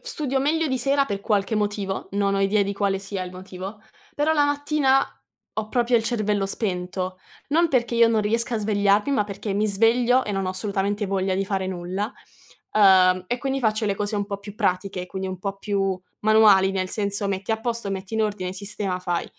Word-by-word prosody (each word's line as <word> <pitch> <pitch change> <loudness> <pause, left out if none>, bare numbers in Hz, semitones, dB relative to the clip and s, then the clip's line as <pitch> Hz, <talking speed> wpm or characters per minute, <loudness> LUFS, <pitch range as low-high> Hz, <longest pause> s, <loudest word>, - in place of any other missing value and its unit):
Studio 300 - -2
meglio 310 +4 +1
di 260 -1 0
sera 275 +3 +2
per 200 -6 -4
qualche 205 +1 0
motivo, 205 -2 -2
non 200 0 +1
ho - - 0
idea 200 +1 +3
di 200 0 -2
quale 195 -1 0
sia 195 -1 -4
il 180 - -9
motivo, 190 +3 -8 0.3
però 295 +2 +2
la 295 -2 +3
mattina 290 -2 +2 0.5
ho 215 0 -3
proprio 240 +1 +2
il 225 - 0
cervello 210 -4 0
spento, 185 -2 -3 0.3
non 330 +4 +3
perché 240 -4 +1
io 230 0 +6
non 225 -1 +2
riesca 230 +3 0
a - - 0
svegliarmi, 205 +2 +2
ma 215 -7 +2
perché 200 0 -5
mi 210 +2 +1
sveglio 235 +5 +3
e - - -4
non 195 -2 -1
ho - - 0
assolutamente 200 +1 -1
voglia 190 -1 0
di 195 +1 0
fare 190 -1 -2
nulla, 185 +5 -3 0.6
uhm, 185 -3 +5
e 245 +6 -2
quindi 270 +1 -1
faccio 220 -3 0
le 200 -2 0
cose 205 +1 -2
un 205 -1 -1
po' 200 -1 -4
più 200 0 -10
pratiche, 185 -2 -1
quindi 190 +1 -5
un 185 -1 -6
po' 195 0 -3
più 195 -2 -1 0.2
manuali, 210 -3 +5
nel 190 -1 -2
senso: 200 0 -1
metti 195 +1 -3
a 220 0 0
posto, 230 -3 -2
metti 195 +2 -5
in 220 - +2
ordine, 200 -4 -2
sistema, 195 -1 -3
fai. 175 -1 -1
205 Hz, 205 wpm, -24 LUFS, 195-230 Hz, 0.6 s, io